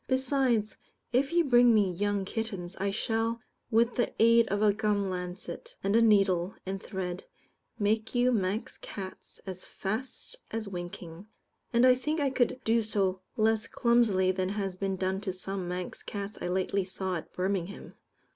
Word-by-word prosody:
Besides, 260 Hz, -4 st, +1 dB, 0.4 s
if 270 Hz, +4 st, +2 dB
you 345 Hz, 0 st, +4 dB
bring 245 Hz, -4 st, +6 dB
me 200 Hz, -3 st, +3 dB
young 200 Hz, +1 st, 0 dB
kittens, 195 Hz, -5 st, -4 dB
I 200 Hz, +1 st, 0 dB
shall, 225 Hz, +2 st, -1 dB, 0.3 s
with 235 Hz, +1 st, +3 dB
the 240 Hz, -, +1 dB
aid 230 Hz, 0 st, +6 dB
of 205 Hz, +2 st, 0 dB
a 210 Hz, -1 st, +5 dB
gum 205 Hz, -2 st, 0 dB
lancet, 180 Hz, -, -6 dB
and 200 Hz, +2 st, +2 dB
a 230 Hz, -, +6 dB
needle 195 Hz, -4 st, +3 dB
and 190 Hz, 0 st, -4 dB
thread, 180 Hz, -2 st, -4 dB, 0.5 s
make 220 Hz, +2 st, 0 dB
you 245 Hz, +1 st, +4 dB
Manx 205 Hz, -1 st, -1 dB
cats 190 Hz, -2 st, -8 dB
as 185 Hz, -2 st, -7 dB
fast 250 Hz, -, -5 dB
as 225 Hz, -2 st, -4 dB
winking; 175 Hz, 0 st, -7 dB, 0.4 s
and 235 Hz, +1 st, +5 dB
I 255 Hz, -, +8 dB
think 300 Hz, +5 st, -1 dB
I 280 Hz, -2 st, +1 dB
could 255 Hz, -1 st, +1 dB
do 230 Hz, +1 st, +3 dB
so 195 Hz, -4 st, 0 dB, 0.2 s
less 220 Hz, 0 st, +2 dB
clumsily 225 Hz, -6 st, +3 dB
than 185 Hz, 0 st, -1 dB
has 195 Hz, -2 st, -2 dB
been 195 Hz, 0 st, -1 dB
done 190 Hz, +1 st, -1 dB
to 200 Hz, -2 st, -2 dB
some 190 Hz, 0 st, -4 dB
Manx(?) 180 Hz, 0 st, -4 dB
cats 205 Hz, 0 st, -5 dB
I -, -, -2 dB
lately 190 Hz, +2 st, 0 dB
saw 185 Hz, 0 st, -3 dB
at 160 Hz, -, -9 dB
Birmingham. 190 Hz, +1 st, -3 dB
205 Hz, 165 wpm, -29 LUFS, 190-230 Hz, 0.5 s, I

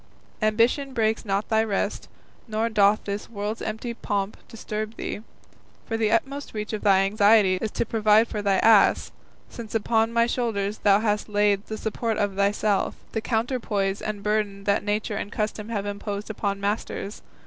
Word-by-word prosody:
Ambition 235 Hz, +6 st, +2 dB
breaks 220 Hz, 0 st, +1 dB
not 200 Hz, 0 st, -1 dB
thy 220 Hz, -1 st, +3 dB
rest, 205 Hz, -1 st, -2 dB, 0.4 s
nor 220 Hz, +1 st, -1 dB
doth 210 Hz, -1 st, +3 dB
this 200 Hz, 0 st, -5 dB
world's 210 Hz, 0 st, -4 dB
empty 220 Hz, +2 st, -4 dB
pomp 200 Hz, -3 st, -2 dB
disturb 215 Hz, 0 st, -5 dB
thee, -, -, -4 dB, 0.7 s
for 225 Hz, -, -3 dB
the 225 Hz, -1 st, +1 dB
utmost 275 Hz, +3 st, -1 dB
reach 210 Hz, +1 st, -4 dB
of 215 Hz, -, -3 dB
thy 195 Hz, -2 st, +5 dB
anxiety 205 Hz, -1 st, +4 dB
is 220 Hz, -, -1 dB
to -, -, -2 dB
provide 215 Hz, 0 st, +4 dB
for 210 Hz, -, -4 dB
thy 200 Hz, -1 st, +2 dB
ass, 220 Hz, -2 st, +5 dB, 0.4 s
since 225 Hz, -2 st, -8 dB
upon 225 Hz, +1 st, +2 dB
my 235 Hz, 0 st, +3 dB
shoulders 220 Hz, -4 st, -1 dB
thou 200 Hz, 0 st, +4 dB
hast 210 Hz, -1 st, 0 dB
laid 205 Hz, -1 st, +2 dB
the 220 Hz, -, -4 dB
support 220 Hz, +1 st, -2 dB
of 200 Hz, -1 st, 0 dB
thyself, 200 Hz, +1 st, +1 dB, 0.2 s
the 220 Hz, -, -2 dB
counterpoise 220 Hz, -4 st, -1 dB
and 210 Hz, -2 st, -4 dB
burden 210 Hz, -1 st, -1 dB
that 200 Hz, 0 st, +1 dB
nature 210 Hz, +1 st, -1 dB
and 205 Hz, -, -5 dB
custom 215 Hz, 0 st, -3 dB
have 205 Hz, -3 st, -2 dB
imposed 205 Hz, +1 st, -4 dB
upon 200 Hz, -2 st, -2 dB
masters. 205 Hz, 0 st, -3 dB
215 Hz, 170 wpm, -25 LUFS, 205-225 Hz, 0.7 s, thy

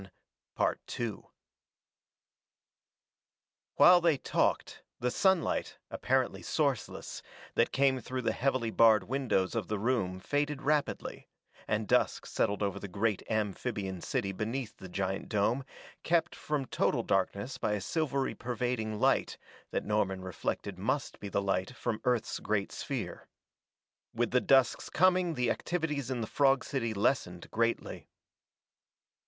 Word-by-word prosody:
While 180 Hz, 0 st, +8 dB
they 165 Hz, -4 st, +3 dB
talked, -, -, 0 dB, 0.2 s
the 125 Hz, +1 st, 0 dB
sunlight, 190 Hz, +1 st, +1 dB
apparently -, -, 0 dB
sourceless, -, -, -2 dB, 0.3 s
that -, -, +2 dB
came 135 Hz, -1 st, +3 dB
through 130 Hz, +2 st, -4 dB
the -, -, +2 dB
heavily 130 Hz, -3 st, 0 dB
barred 110 Hz, -2 st, +6 dB
windows 125 Hz, -7 st, 0 dB
of 115 Hz, -5 st, -2 dB
the 105 Hz, -, -1 dB
room 100 Hz, -5 st, 0 dB
faded 145 Hz, +5 st, -1 dB
rapidly, 150 Hz, 0 st, -1 dB, 0.4 s
and 105 Hz, 0 st, 0 dB
dusk -, -, +2 dB
settled 105 Hz, +1 st, 0 dB
over 100 Hz, -1 st, -1 dB
the 100 Hz, -, -6 dB
great 105 Hz, +2 st, 0 dB
amphibian 105 Hz, -3 st, -2 dB
city 110 Hz, -4 st, -1 dB
beneath 115 Hz, +5 st, -3 dB
the 95 Hz, -, -10 dB
giant 95 Hz, +1 st, -2 dB
dome, 110 Hz, +5 st, +1 dB, 0.4 s
kept 165 Hz, -1 st, +1 dB
from 150 Hz, -3 st, -2 dB
total -, -, 0 dB
darkness 100 Hz, +7 st, -1 dB
by 105 Hz, -, 0 dB
a 105 Hz, -, 0 dB
silvery 140 Hz, -, -1 dB
pervading 120 Hz, -3 st, -2 dB
light -, -, +2 dB, 0.3 s
that -, -, -2 dB
Norman 95 Hz, -3 st, 0 dB
reflected 95 Hz, +1 st, -4 dB
must 130 Hz, +8 st, -1 dB
be 100 Hz, -, -6 dB
the 100 Hz, +1 st, 0 dB
light 95 Hz, +4 st, -1 dB
from 115 Hz, -4 st, -3 dB
Earth's 125 Hz, -2 st, 0 dB
great 100 Hz, -2 st, -1 dB
sphere. -, -, -5 dB, 0.9 s
With 120 Hz, +1 st, 0 dB
the 125 Hz, -, +3 dB
dusk's 135 Hz, -3 st, +3 dB
coming 180 Hz, -1 st, +3 dB
the 125 Hz, -3 st, +1 dB
activities 150 Hz, -7 st, -2 dB
in 125 Hz, -3 st, -2 dB
the -, -, -1 dB
frog 135 Hz, +2 st, +3 dB
city 115 Hz, -5 st, -2 dB
lessened 100 Hz, -5 st, 0 dB
greatly. 115 Hz, +1 st, -1 dB
115 Hz, 130 wpm, -31 LUFS, 100-135 Hz, 0.9 s, While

